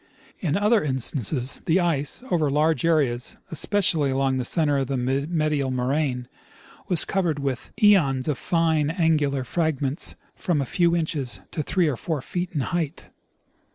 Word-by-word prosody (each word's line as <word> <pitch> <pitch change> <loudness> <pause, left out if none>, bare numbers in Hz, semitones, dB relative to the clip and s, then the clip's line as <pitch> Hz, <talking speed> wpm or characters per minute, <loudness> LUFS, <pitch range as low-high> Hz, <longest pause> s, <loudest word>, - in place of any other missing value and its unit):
In 160 -2 0
other 210 0 +3
instances 130 -1 -2
the 165 +3 +3
ice 165 - -1
over 155 -4 +2
large 155 +4 +2
areas, 140 -7 +1
especially 165 -2 +1
along 135 0 +1
the 130 - -1
center 145 -3 +2
of 135 - -1
the 135 0 -1
medial 140 +2 0
moraine, 130 0 -1 0.6
was 180 -3 +3
covered 175 -6 0
with 135 -3 -3
cones 165 - +4
of 150 -4 -1
fine, 160 -3 +1
angular 155 -5 +1
frag 155 +1 -1
ments 140 +3 -3 0.2
from 170 -5 -1
a 140 - 0
few 170 +5 +2
inches 155 -6 -2
to 155 - -2
three 175 +3 +1
or 140 -5 -1
four 160 +2 -2
feet 180 0 -3
in 150 - -1
height. 165 +2 -3
150 Hz, 155 wpm, -24 LUFS, 135-170 Hz, 0.6 s, cones